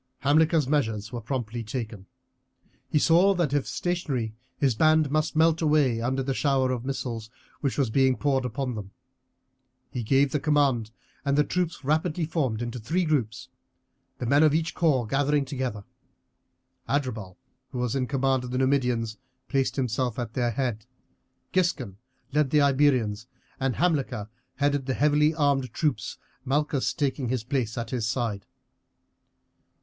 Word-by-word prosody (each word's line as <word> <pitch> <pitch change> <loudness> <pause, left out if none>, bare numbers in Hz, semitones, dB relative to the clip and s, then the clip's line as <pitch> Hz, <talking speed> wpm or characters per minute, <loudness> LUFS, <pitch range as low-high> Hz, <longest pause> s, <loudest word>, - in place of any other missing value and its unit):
Hamilcar's 155 +1 +3
measures 110 -8 0
were 120 - -4
promptly 120 -1 -3
taken. 110 -4 -6 0.8
He - - +2
saw 175 +6 +5
that 170 -6 0
if 145 -2 +1
stationary 145 -11 -2 0.2
his 135 -4 +2
band 155 +3 +3
must 155 +1 0
melt 160 +1 +3
away 145 -7 +3
under 130 +3 0
the 135 +1 -1
shower 130 -2 +1
of 125 -2 -2
missiles 120 -4 -4 0.3
which 140 -3 -1
was 135 -6 +1
being 130 +1 +3
poured 135 -2 +1
upon 125 +1 -3
them. 105 -3 -6 1.0
He 125 - -3
gave 135 +4 +3
the 150 - 0
command 140 -7 +2 0.3
and 140 0 +1
the 150 - +5
troops 175 -1 -2
rapidly 155 +3 0
formed 135 -8 -1
into 120 +1 -4
three 170 +11 0
groups, 125 -9 -1 0.7
the - - -4
men 140 +5 +4
of 155 -1 +5
each 165 0 0
corps 145 -8 +2
gathering 140 +4 +1
together. 130 -6 -4 1.1
Adherbal, 115 -10 -2 0.3
who 130 - -6
was 125 +1 -1
in 130 -2 0
command 135 -1 +1
of 125 - -6
the 125 - -2
Numidians, 125 -4 +1 0.3
placed 135 -1 +1
himself 125 -2 -1
at 120 -3 -4
their 120 -2 +1
head, 120 -3 -2 0.7
Giscon 155 - 0 0.4
led 150 -2 +2
the 150 - +4
Iberians, 130 -6 +2 0.3
and 135 -2 0
Hamilcar 135 - 0 0.3
headed 145 -2 0
the 130 - 0
heavily 150 +1 +3
armed 140 -5 +1
troops, 140 -10 -1 0.3
Malchus 140 0 0
taking 140 -4 -1
his 125 -3 -1
place 125 -3 -2
at 115 -1 -4
his 120 -4 -1
side. 115 -5 -2
135 Hz, 155 wpm, -26 LUFS, 120-150 Hz, 1.1 s, saw